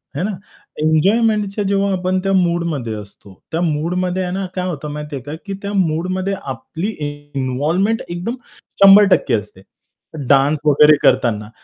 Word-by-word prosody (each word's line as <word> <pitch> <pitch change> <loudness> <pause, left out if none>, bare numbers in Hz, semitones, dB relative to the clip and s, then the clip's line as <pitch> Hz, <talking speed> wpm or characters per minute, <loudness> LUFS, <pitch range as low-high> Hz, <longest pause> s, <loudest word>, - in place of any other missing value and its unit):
हे 155 - -2
ना, 210 - -1 0.5
एन्जॉयमेंटच्या 205 +6 +2
जेव्हा 200 0 +1
आपण 185 0 0
त्या 195 - 0
मूडमध्ये 170 -10 0
असतो, 100 -1 -12 0.2
त्या 165 +2 -1
मूडमध्ये 180 +3 -1
आहे 180 - -3
ना 195 0 -2
काय 180 0 -2
होतं 150 -3 -5
माहिती 150 0 -6
आहे 130 - -7
का, 145 +2 -7
की 200 - -5
त्या 200 0 -4
मूडमध्ये 185 +2 0
आपली 160 +7 -5 0.5
इन्व्हॉल्वमेंट 155 - 0
एकदम 180 +8 -4 0.5
100% 195 0 +6
असते. 105 -2 -6 0.7
डान्स 140 +2 +3
वगैरे 150 +1 +6
करताना, 105 -3 +2
175 Hz, 145 wpm, -18 LUFS, 145-195 Hz, 0.7 s, 100